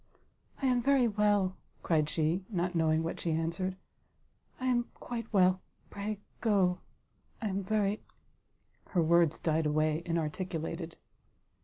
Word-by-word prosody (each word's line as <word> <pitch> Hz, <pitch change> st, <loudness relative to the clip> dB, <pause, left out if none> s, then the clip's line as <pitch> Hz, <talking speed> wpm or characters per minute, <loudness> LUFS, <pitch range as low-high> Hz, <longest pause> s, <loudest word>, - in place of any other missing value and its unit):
"I -, -, +3 dB
am 250 Hz, -2 st, +3 dB
very 270 Hz, -1 st, +4 dB
well, 205 Hz, -3 st, +2 dB
" -, -, -36 dB
cried 155 Hz, -3 st, +2 dB
she, 160 Hz, +4 st, 0 dB
not 180 Hz, -3 st, -1 dB
knowing 160 Hz, -1 st, +2 dB
what 165 Hz, -, -3 dB
she 170 Hz, -, -1 dB
answered, 170 Hz, +4 st, -1 dB, 0.8 s
"I 260 Hz, -, -3 dB
am 245 Hz, -2 st, +2 dB
quite 230 Hz, -2 st, -6 dB
well, 185 Hz, -2 st, +4 dB, 0.3 s
pray 210 Hz, +1 st, -3 dB, 0.2 s
go, 195 Hz, -5 st, +2 dB, 0.6 s
I 220 Hz, -, -2 dB
am 195 Hz, +1 st, -1 dB
very 205 Hz, +1 st, 0 dB, 0.4 s
" -, -, -42 dB
her 170 Hz, -, +5 dB
words 170 Hz, -1 st, +4 dB
died 160 Hz, -1 st, +1 dB
away 155 Hz, +1 st, +1 dB
inarticulated. 165 Hz, 0 st, -3 dB
180 Hz, 140 wpm, -31 LUFS, 165-210 Hz, 0.8 s, her